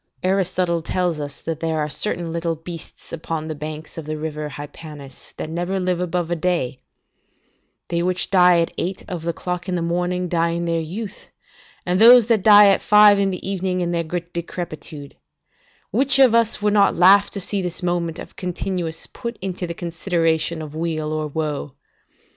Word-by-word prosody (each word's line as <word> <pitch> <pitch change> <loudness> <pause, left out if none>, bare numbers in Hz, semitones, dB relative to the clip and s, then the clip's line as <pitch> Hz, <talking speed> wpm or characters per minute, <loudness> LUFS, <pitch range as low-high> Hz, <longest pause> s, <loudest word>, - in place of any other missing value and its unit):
Aristotle 185 -2 +1
tells 175 -1 -1
us 145 -1 -6
that 160 -1 -4
there 160 -1 -1
are 150 -1 0
certain 170 +2 -3
little 165 0 -2
beasts 165 +1 -10
upon 160 -1 -4
the 155 - -3
banks 155 +2 -7
of 155 - -9
the 155 0 -3
river 150 -1 -4
Hypanis, 145 -1 -10
that - - -4
never 175 +4 -2
live 180 -1 0
above 175 -1 -2
a - - +2
day: 165 -7 -1 1.1
they 170 0 0
which 180 +1 -1
die 180 -2 +6
at 165 - -2
eight 185 +2 -3
of 180 -3 -5
the 170 +1 -1
clock 180 +2 -4
in 180 - 0
the 175 - -1
morning, 180 +1 -1
die 170 -1 +1
in 170 0 -2
their 165 -1 0
youth, 195 +6 -7 0.6
and 180 +3 +1
those 240 0 +9
that 225 -2 +2
die 205 0 +8
at 195 - +3
five 210 -1 +6
in 195 -1 +2
the 185 0 -5
evening, 185 -1 -1
in 175 -1 -1
their 170 -1 0 0.3
decrepitude: 160 -4 -6 0.7
which 265 +6 +2
of 265 -4 +6
us 230 -2 +2
would 210 -1 +3
not 200 -1 +4
laugh 195 +3 +6
to 200 - -4
see 200 +1 -1
this 180 0 -5
moment 175 -2 -1
of - - -10
continuance 180 -2 -4
put 235 -2 -7
into 185 -1 -4
the 170 - -5
consideration 170 -2 -1
of 150 -1 -9
weal 155 -1 -2
or 155 -1 -2
woe? 150 -2 -4
175 Hz, 185 wpm, -21 LUFS, 160-185 Hz, 1.1 s, those